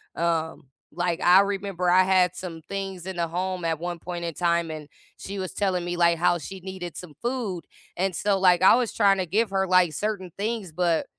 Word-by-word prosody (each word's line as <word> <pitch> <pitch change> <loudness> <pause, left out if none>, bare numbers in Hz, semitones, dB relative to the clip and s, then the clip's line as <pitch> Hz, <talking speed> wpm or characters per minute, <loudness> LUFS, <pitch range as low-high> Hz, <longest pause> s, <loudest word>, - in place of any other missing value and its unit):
um, 160 -3 -2 0.2
like, 175 +1 -2
I 180 +2 +7
remember 195 -2 -2
I 185 +1 +6
had 185 -1 +3
some 170 -3 -7
things 195 -3 -5
in 190 0 -5
the 170 -1 0
home 180 +2 -3
at 165 -2 -1
one 175 0 -4
point 175 0 -5
in 170 - -3
time 170 -1 0
and 155 -2 -7 0.3
she 200 +1 -7
was 185 -1 -4
telling 185 -3 -1
me, 175 0 -3
like, 170 -1 +3
how 175 +1 +2
she 190 +5 -8
needed 185 -2 -7
some 175 -4 -9
food 235 -8 -3 0.3
and 190 0 0
so, 200 +1 +1
like, 180 -2 +4
I 190 - +8
was 245 -2 0
trying 200 -2 +4
to 185 - 0
give 210 +4 +1
her, 190 -1 0
like, 185 -3 +4
certain 200 0 -3
things, 210 -3 -3
but, 170 0 +1
180 Hz, 215 wpm, -25 LUFS, 170-195 Hz, 0.3 s, I